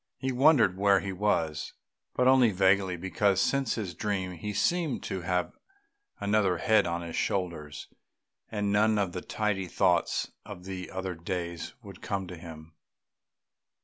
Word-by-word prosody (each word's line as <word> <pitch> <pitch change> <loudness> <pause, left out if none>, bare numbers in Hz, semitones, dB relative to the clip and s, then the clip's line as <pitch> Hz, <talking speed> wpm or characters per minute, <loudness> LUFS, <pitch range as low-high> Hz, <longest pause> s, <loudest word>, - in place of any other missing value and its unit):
He 130 0 -2
wondered 130 - +4
where 100 -1 +5
he 95 0 -4
was, 85 -6 -1 0.4
but 125 - +3
only 130 -2 +6
vaguely, 95 -1 +2
because 95 +2 +1
since 135 -4 +1
his 100 -6 -4
dream 95 -2 -2
he 90 +4 -5
seemed 155 - 0
to 95 - -4
have 90 0 -1 0.7
another 100 -3 +2
head 110 +1 +3
on 85 0 -2
his 85 -1 -6
shoulders, 80 -6 -3 0.6
and 105 -2 -1
none 105 +1 +3
of 100 -3 0
the 90 - -5
tidy 100 -3 -2
thoughts - - +1
of 90 +1 -10 0.2
other 95 -1 -3
days 85 0 -5
would - - -12
come 100 -1 -2
to 90 - -7
him. 80 -1 -11
95 Hz, 145 wpm, -29 LUFS, 90-105 Hz, 0.7 s, only